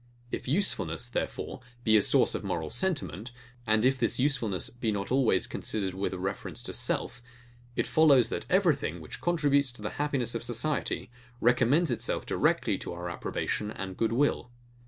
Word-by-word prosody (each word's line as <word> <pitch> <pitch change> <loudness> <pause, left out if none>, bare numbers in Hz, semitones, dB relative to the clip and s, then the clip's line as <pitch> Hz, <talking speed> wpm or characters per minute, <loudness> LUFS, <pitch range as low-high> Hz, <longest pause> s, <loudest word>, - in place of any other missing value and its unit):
If - - -4
usefulness, 125 - 0
therefore, 120 - -4 0.2
be 110 -2 +4
a 105 - +7
source - - +4
of - - -3
moral 80 -1 -3
sentiment, 145 - -2 0.4
and 110 +2 +3
if 130 0 +3
this 115 +1 +2
usefulness 125 -8 0
be 120 -2 -2
not 100 +1 -3
always 130 -2 +3
considered 95 -4 -3
with 95 +1 -2
a 95 - -4
reference 95 +2 -4
to - - -4
self; 120 - 0 0.5
it - - +1
follows, 140 -7 +5
that - - -4
everything, 160 - +2
which 80 - -9
contributes 145 -6 +2
to 105 - -12
the 105 - -3
happiness 135 -5 -1
of 115 - -3
society, 120 +2 -2 0.3
recommends 130 +7 +3
itself 120 - -1
directly - - +1
to - - -5
our 85 0 -5
approbation 105 +4 -3
and 95 -3 -6
good 115 +2 0
will. 130 0 +1
120 Hz, 170 wpm, -29 LUFS, 105-140 Hz, 0.5 s, a